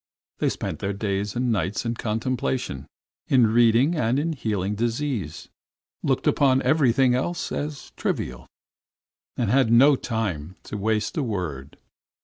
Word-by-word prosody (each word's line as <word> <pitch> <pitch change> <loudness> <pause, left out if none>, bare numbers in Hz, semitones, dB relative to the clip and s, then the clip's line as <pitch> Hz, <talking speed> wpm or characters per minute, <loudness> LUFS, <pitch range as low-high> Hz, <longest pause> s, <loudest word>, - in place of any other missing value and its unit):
They - - +2
spent - - -4
their 100 +1 -2
days 100 0 -2
and 125 0 0
nights 105 +1 -1
in 115 - 0
contemplation, 115 - -2 0.4
in 125 -3 +5
reading 120 +6 +4
and 130 -6 +1
in 160 +3 0
healing 105 -7 -2
disease, 115 - -2 0.5
looked - - 0
upon 135 -1 +3
everything 135 -4 +3
else 170 +8 -2
as 145 -1 -5
trivial, 60 +1 -3 0.9
and 115 -4 0
had 130 -3 +3
no 135 +5 +7
time 95 - -3
to - - -7
waste 105 +4 -1
a 150 - +1
word. 80 - -4
115 Hz, 135 wpm, -24 LUFS, 100-130 Hz, 0.9 s, no